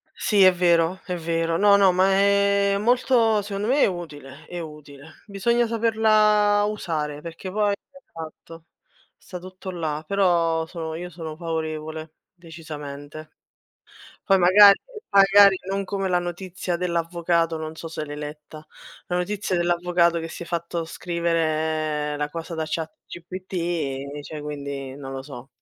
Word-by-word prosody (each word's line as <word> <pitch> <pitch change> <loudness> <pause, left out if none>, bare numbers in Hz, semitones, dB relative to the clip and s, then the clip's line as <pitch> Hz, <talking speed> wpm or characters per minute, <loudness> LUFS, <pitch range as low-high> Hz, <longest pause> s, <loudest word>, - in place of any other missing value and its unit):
Sì, 205 -3 +3
è 185 0 +7
vero, 175 0 +2
è 180 - -3
vero. 165 0 -1
No, 205 +1 +6
no, 195 -2 +5
ma 185 +2 +3
è 200 0 +3
molto 230 -1 +3
secondo 200 +1 -4
me 275 +4 +3
è - - +7
utile 155 -6 -8
è 175 - -7
utile. 150 -2 -11
Bisogna 235 +4 +1
saperla 215 -2 +3
usare, 155 -8 -3
perché 170 +3 -7
poi 205 0 +1 0.2
esatto, 165 - -12 0.5
sta 180 - -9
tutto 185 +1 -9
là. 155 -3 -3
Però 170 -4 +2
sono 160 -2 -6
io 175 +2 -6
sono 160 -2 -7
favorevole, 160 -1 -5 0.2
decisamente. 155 -3 -10 0.9
Poi 195 -2 +4
magari 195 +3 +7 0.3
magari 195 0 +7
non 195 +1 -1
come 195 0 -2
la 180 -1 +2
notizia 175 0 -4
dell'avvocato, 170 -1 0
non 155 0 -6
so 165 - -7
se 160 -1 -5
l'hai 145 0 -7
letta. 150 +1 -9 0.4
La 180 - -2
notizia 190 +1 -2
dell'avvocato 175 0 +2
che 165 - -5
si 165 - -8
è - - -11
fatto 170 0 -3
scrivere 160 -3 -1
la 150 0 -2
cosa 165 +2 -6
da 160 -1 -2
ChatGPT, 175 +4 -7
e 145 -5 -3
cioè, 155 +1 -7
quindi 140 -2 -6
non 135 -1 -8
lo 135 0 -6
so. 135 -2 -10
170 Hz, 145 wpm, -24 LUFS, 155-195 Hz, 0.9 s, è